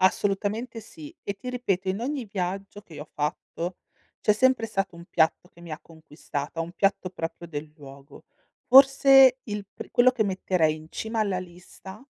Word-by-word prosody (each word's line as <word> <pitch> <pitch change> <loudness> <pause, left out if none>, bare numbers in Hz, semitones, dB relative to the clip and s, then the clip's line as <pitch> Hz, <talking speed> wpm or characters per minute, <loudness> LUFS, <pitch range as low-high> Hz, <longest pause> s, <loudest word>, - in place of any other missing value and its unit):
Assolutamente 205 +5 0
sì. 305 +8 -12
E 200 - -4
ti 225 +6 -9
ripeto, 195 -7 -1
in 190 +3 -1
ogni 265 0 -3
viaggio 195 +1 -4
che 165 - -15
io 150 - -7
ho - - -29
fatto 170 +3 -4 0.4
c'è 210 - +4
sempre 255 0 +2
stato 195 -4 -3
un 170 - -11
piatto 170 +1 +1
che 170 - -20
mi 170 -2 -11
ha 155 - -5
conquistata, 155 -1 -7
un 165 +1 -4
piatto 195 -2 0
proprio 170 -1 -6
del 150 -1 -6
luogo. 140 -1 -14 0.4
Forse 270 0 +7
il 205 -2 -5
pri - - -10
quello 250 +1 +5
che 235 -4 0
metterei 185 -5 +1
in 155 0 -11
cima 220 0 -3
alla 195 -3 0
lista 185 +4 -11
195 Hz, 180 wpm, -26 LUFS, 170-225 Hz, 0.4 s, Forse